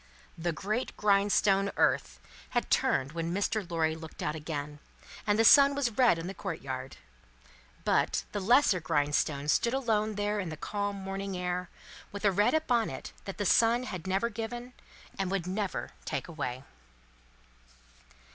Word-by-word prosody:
The 170 +1 -2
great 210 +9 -3
grindstone, 200 -1 +3
Earth, - - +1 0.4
had 240 - -1
turned 150 - +2
when 165 +1 -3
Mr. 200 0 -1
Lorry 160 -2 0
looked 160 -1 -9
out 150 - -1
again, 150 -1 -5 0.5
and 205 0 +3
the 225 - +4
sun 280 +3 +8
was 275 -4 0
red 245 -9 +5
on 165 - -5
the 190 - -4
courtyard. 140 - -5 0.9
But, - - +2
the 205 - -2
lesser 220 -1 +4
grindstone 145 -2 0
stood 235 - +2
alone 220 -5 0
there 205 +1 -1
in 185 -4 -3
the 155 - -6
calm 205 +4 -3
morning 195 0 -4
air, 180 0 -2 0.4
with 200 +1 -5
a 200 - +5
red 205 +9 +3
upon 245 -8 +1
it - - -7
that 195 - -6
the 205 - -2
sun 230 +5 +4
had 185 -8 -6
never 195 +5 +1
given, 240 +3 -6 0.5
and 195 -2 0
would 190 -3 -1
never 195 +1 -3
take - - -3
away. 130 -6 -4
195 Hz, 155 wpm, -30 LUFS, 165-215 Hz, 0.9 s, sun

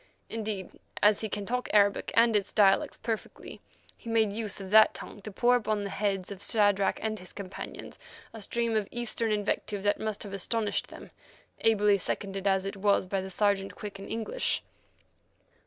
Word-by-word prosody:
Indeed, 215 -4 -4 0.2
as 210 0 +5
he 220 - -3
can 205 0 -4
talk 250 +3 -2
Arabic 205 -1 +3
and 230 -1 +5
its 205 -2 0
dialects 195 -2 +3
perfectly, 220 -1 -5 0.3
he 230 - -10
made 220 -3 +2
use 215 -1 -3
of 190 -1 -7
that 220 0 +7
tongue 205 - -7
to 215 - -7
pour 245 +5 +3
upon 215 -3 0
the 200 - -4
heads 195 -2 -1
of 200 -1 -8
Shadrach 205 -3 +3
and 215 -1 -2
his 180 - -10
companions 195 -2 -8 0.3
a 225 - -8
stream 230 +2 -1
of 210 -2 +1
Eastern 235 -1 -2
invective 205 -1 -1
that 205 0 +2
must 215 -1 -3
have 200 -2 -8
astonished 205 +1 -1
them, - - -12 0.5
ably 210 -2 +4
seconded 195 0 -3
as 190 -1 +2
it 195 +1 -4
was 200 -1 +2
by 190 0 -2
Sergeant 195 +1 0
Quick 205 -2 -7
in 195 - -8
English. 230 - -1
205 Hz, 175 wpm, -29 LUFS, 195-220 Hz, 0.5 s, that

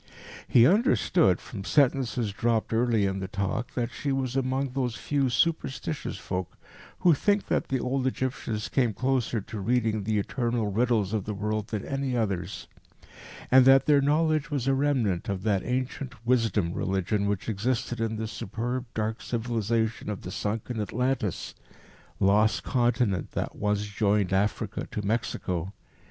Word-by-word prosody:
He 120 -1 +6
understood, 180 - +3
from 100 -4 -8
sentences 125 -3 +2
dropped 115 +1 0
early 115 -3 +2
in 95 0 -1
the 95 - -4
talk, 100 +5 -3
that 120 -1 -1
she 140 - -3
was 135 -2 -1
among 135 +1 0
those 125 -2 -2
few 140 -3 0
"superstitious" 155 +2 -1
folk 90 -2 -4 0.4
who 175 - +6
think 205 +7 +1
that - - +1
the 130 - 0
old 130 +1 0
Egyptians 125 -5 -2
came 120 -6 +1
closer 130 -4 0
to 105 +2 -7
reading 110 0 +1
the 110 +1 0
eternal 115 0 -1
riddles 110 -2 +1
of 105 -3 -1
the 105 - -3
world 105 +1 -2
than 110 -3 -4
any 135 -2 -2
others, 95 -5 -2 0.8
and 130 0 +8
that 135 0 +7
their 145 -2 +5
knowledge 155 +1 +2
was 140 -4 -1
a 135 - +3
remnant 130 -11 +1
of 95 -1 -3
that 100 -3 +1
ancient 125 -1 -4
Wisdom 115 -8 +2
Religion 95 +2 0
which 100 -1 -2
existed 115 +2 -1
in 110 -1 -1
the 110 +1 -3
superb, 120 +4 -4
dark 110 0 -2
civilization 115 -2 -1
of 105 - -5
the 90 - -6
sunken 110 +3 -3
Atlantis, 125 -2 -2 0.7
lost 105 +3 +3
continent 120 - +1
that - - -3
once 105 0 0
joined 100 -2 +1
Africa 105 +2 -1
to 105 - -4
Mexico. 95 -4 -2
115 Hz, 155 wpm, -27 LUFS, 105-130 Hz, 0.8 s, and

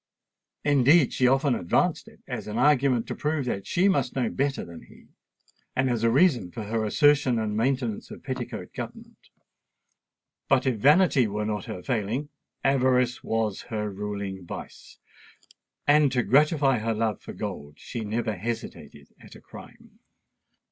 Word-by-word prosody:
Indeed, 145 +1 +4
she 125 - +3
often 135 +1 +3
advanced 85 -7 0
it - - -17
as - - -5
an 105 +1 -4
argument 135 -5 +3
to - - -5
prove 150 -2 -2
that 100 -5 -3
she 185 +3 +2
must 140 -10 +1
know 125 -4 0
better 140 0 -1
than 85 -1 -11
he, - - -19 0.7
and 130 -1 +1
as 115 -2 -1
a 115 - +4
reason 130 - +3
for 105 +6 -7
her 110 +1 -2
assertion 145 +2 +3
and 110 -2 -2
maintenance 120 -1 -1
of - - -11
petticoat - - -6
government. - - -9 1.2
But 135 -1 +3
if 130 -4 +1
vanity 145 - +4
were 105 +1 -3
not 105 -2 -3
her 90 - -7
failing, 125 +4 -2 0.3
avarice 125 -2 +2
was 110 -3 -1
her 105 -2 -3
ruling 100 -1 -5
vice; 85 - -10 0.9
and 145 -1 +4
to 125 -2 +2
gratify 140 - +3
her 115 +1 -1
love 110 -2 -1
for - - -9
gold 70 0 -6
she 120 - -6
never 110 0 -2
hesitated 115 +5 -6
at - - -14
a - - -12
crime. - - -15
120 Hz, 155 wpm, -26 LUFS, 105-135 Hz, 1.2 s, Indeed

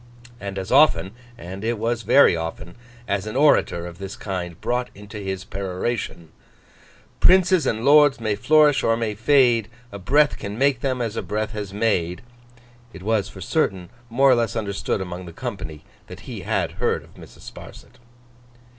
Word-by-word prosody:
And 100 0 -6
as 95 +1 -5
often 125 - +4 0.3
(and 95 0 -8
it 115 +1 -1
was 115 +2 -1
very 115 -1 +5
often) 80 +1 -6 0.3
as 100 +1 -2
an 105 - -5
orator 135 - +3
of 85 0 -10
this 100 0 -7
kind 90 -4 -5
brought 125 0 -2
into 105 +1 -10
his 95 -1 -4
peroration, 95 -2 -4 0.9
'Princes 185 -5 +4
and 110 +2 -1
lords 145 -1 +6
may 110 -2 -1
flourish 150 +3 +4
or 115 0 +2
may 115 -2 -2
fade, 120 -1 +3 0.2
A 100 - -8
breath 145 +9 +2
can 100 +1 -6
make 135 -1 +2
them, 130 -3 -1
as 115 -2 -4
a - - -2
breath 110 +1 -3
has 105 -3 -6
made,' 100 -3 -1 0.7
—it 90 - -11
was, 110 -1 0
for 95 - -12
certain, 95 - -1 0.2
more 135 +4 +4
or - - +6
less 115 -1 -1
understood 100 -2 -2
among 90 0 -6
the 85 - -10
company 80 -5 -7 0.2
that - - -11
he - - -8
had - - -1
heard - - 0
of - - -20
Mrs. - - -15
Sparsit. 125 - -13
105 Hz, 170 wpm, -22 LUFS, 95-125 Hz, 0.9 s, lords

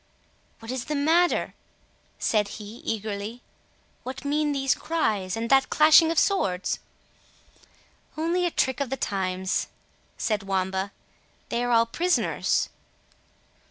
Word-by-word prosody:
"What 225 +1 -8
is 255 -2 -3
the 300 - -2
matter?" 325 +5 +2 0.6
said 210 -2 +1
he 215 +2 -9
eagerly; 215 +1 -4 0.6
"what 260 +3 -7
mean 295 +1 +1
these 270 -2 +2
cries, 215 - -1
and 230 +1 -2
that 270 0 +5
clashing 315 +1 +6
of 330 - -1
swords?" 195 - +1 1.4
"Only 345 +3 +1
a - - 0
trick 260 -5 0
of 280 -3 -1
the 270 - -2
times," 190 -3 -1 0.5
said 215 -2 0
Wamba; 190 0 -1 0.6
"they 235 - -1
are 245 - -1
all 230 -1 +5
prisoners." 350 +10 0
240 Hz, 125 wpm, -26 LUFS, 205-305 Hz, 1.4 s, clashing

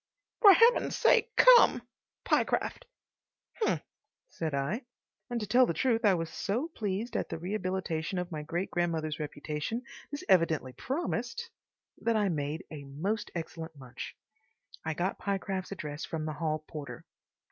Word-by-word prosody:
"For 410 -4 +11
Heaven's 460 +6 +5
sake 485 - +4
come.—Pyecraft." 365 - +3 0.8
"H'm," 430 - +2 0.5
said 160 -2 -3
I, 145 - -1 0.5
and 240 -1 -1
to 210 - -3
tell 245 +4 +5
the 170 - -1
truth 235 -3 +2
I 200 -3 +6
was 165 -1 -3
so 240 +11 -2
pleased 215 - -3
at - - -1
the - - -3
rehabilitation 185 -2 -2
of 180 0 -3
my 155 -2 -3
great 170 +5 -3
grandmother's 160 -3 -1
reputation 150 - -4 0.3
this 290 +1 -5
evidently 165 -9 +3
promised 275 - -3 0.5
that 230 -1 +2
I 205 -2 +2
made 150 +1 -2
a 155 -2 -6
most 165 +11 -3
excellent 165 -1 -6
lunch. 130 -2 -8 0.7
I 160 0 -2
got 180 +4 -1
Pyecraft's 195 -1 -2
address 150 -5 -5
from 160 -2 -3
the 155 - -3
hall 155 0 -2
porter. 150 -3 -7
180 Hz, 145 wpm, -30 LUFS, 155-225 Hz, 0.8 s, For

